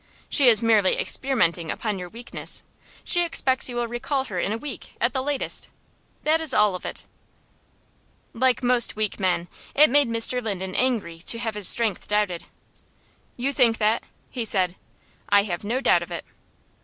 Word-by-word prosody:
She 280 Hz, -4 st, +4 dB
is 225 Hz, -1 st, +5 dB
merely 215 Hz, -4 st, +3 dB
experimenting 180 Hz, -11 st, 0 dB
upon 210 Hz, -4 st, -3 dB
your 180 Hz, -1 st, -7 dB
weakness. 235 Hz, +5 st, -1 dB, 0.4 s
She 350 Hz, -, +2 dB
expects 265 Hz, -7 st, 0 dB
you 245 Hz, -, -6 dB
will 240 Hz, 0 st, -1 dB
recall 250 Hz, +4 st, -2 dB
her 190 Hz, -9 st, -5 dB
in 195 Hz, -, -1 dB
a 220 Hz, -, -1 dB
week, 285 Hz, +3 st, -9 dB
at 235 Hz, +2 st, +1 dB
the 260 Hz, -, -1 dB
latest. 285 Hz, 0 st, -1 dB, 0.6 s
That 315 Hz, +2 st, +2 dB
is 315 Hz, -4 st, +1 dB
all 210 Hz, -2 st, +4 dB
of 180 Hz, -, -6 dB
it." -, -, -7 dB, 1.3 s
Like 255 Hz, +1 st, +1 dB
most 245 Hz, -1 st, +3 dB
weak 215 Hz, -1 st, -2 dB
men, 180 Hz, -2 st, 0 dB, 0.3 s
it 300 Hz, -2 st, +6 dB
made 285 Hz, -2 st, +4 dB
Mr. 230 Hz, +2 st, +1 dB
Linden 190 Hz, -4 st, -4 dB
angry 220 Hz, -11 st, -1 dB
to 210 Hz, +7 st, -4 dB
have 230 Hz, -1 st, -3 dB
his 205 Hz, -3 st, +1 dB
strength 225 Hz, -5 st, +2 dB
doubted. 205 Hz, -5 st, -1 dB, 0.9 s
"You 270 Hz, +3 st, -1 dB
think 235 Hz, -4 st, +3 dB
that?" 215 Hz, +1 st, +1 dB, 0.3 s
he 245 Hz, -, -3 dB
said. 185 Hz, -4 st, +1 dB, 0.5 s
"I 205 Hz, 0 st, +5 dB
have 180 Hz, -3 st, -4 dB
no 235 Hz, +5 st, -1 dB
doubt -, -, +3 dB
of -, -, -7 dB
it." -, -, -6 dB
230 Hz, 175 wpm, -24 LUFS, 200-255 Hz, 1.3 s, it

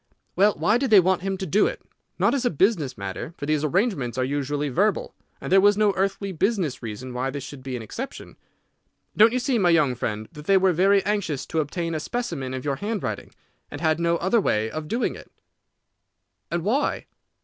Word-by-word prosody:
"Well, 205 Hz, +2 st, +4 dB
why 220 Hz, +3 st, +2 dB
did 270 Hz, -1 st, 0 dB
they 210 Hz, -3 st, +8 dB
want 185 Hz, 0 st, +2 dB
him 195 Hz, 0 st, -2 dB
to 190 Hz, -, -4 dB
do 195 Hz, +5 st, +3 dB
it? -, -, -4 dB, 0.4 s
Not -, -, +2 dB
as 275 Hz, -3 st, 0 dB
a 245 Hz, -, +2 dB
business 165 Hz, -, +1 dB
matter, 100 Hz, -, -6 dB
for 145 Hz, -, -5 dB
these 155 Hz, 0 st, 0 dB
arrangements 155 Hz, -, 0 dB
are 130 Hz, -, +1 dB
usually 145 Hz, +2 st, -2 dB
verbal, 195 Hz, +10 st, 0 dB, 0.3 s
and -, -, -6 dB
there 190 Hz, 0 st, +6 dB
was 205 Hz, +1 st, +5 dB
no 210 Hz, -2 st, +3 dB
earthly 195 Hz, +1 st, -1 dB
business 185 Hz, -, -1 dB
reason 120 Hz, +3 st, -6 dB
why 125 Hz, +2 st, -2 dB
this 140 Hz, 0 st, -5 dB
should 135 Hz, 0 st, -9 dB
be 130 Hz, -1 st, -5 dB
an 120 Hz, -, -5 dB
exception. 260 Hz, -, -7 dB, 0.8 s
Don't 220 Hz, +2 st, +6 dB
you 250 Hz, -, 0 dB
see, 255 Hz, -1 st, 0 dB
my 180 Hz, -3 st, +3 dB
young 155 Hz, -6 st, +3 dB
friend, 110 Hz, -2 st, -4 dB
that 150 Hz, 0 st, -11 dB
they 195 Hz, +2 st, +5 dB
were 190 Hz, -1 st, +3 dB
very 195 Hz, +3 st, +3 dB
anxious 200 Hz, -9 st, -1 dB
to 160 Hz, -, -2 dB
obtain 165 Hz, +3 st, -2 dB
a 155 Hz, -, -1 dB
specimen 150 Hz, -, -4 dB
of 130 Hz, -, -6 dB
your 140 Hz, -2 st, -1 dB
handwriting, 210 Hz, +5 st, -4 dB, 0.4 s
and -, -, -7 dB
had 160 Hz, -1 st, +1 dB
no 170 Hz, 0 st, +2 dB
other 195 Hz, +6 st, +2 dB
way 110 Hz, -, 0 dB
of 155 Hz, -1 st, -5 dB
doing 235 Hz, +9 st, -1 dB
it?" -, -, -13 dB, 1.2 s
"And 170 Hz, -1 st, -2 dB
why?" 255 Hz, +9 st, 0 dB
170 Hz, 210 wpm, -24 LUFS, 140-205 Hz, 1.2 s, they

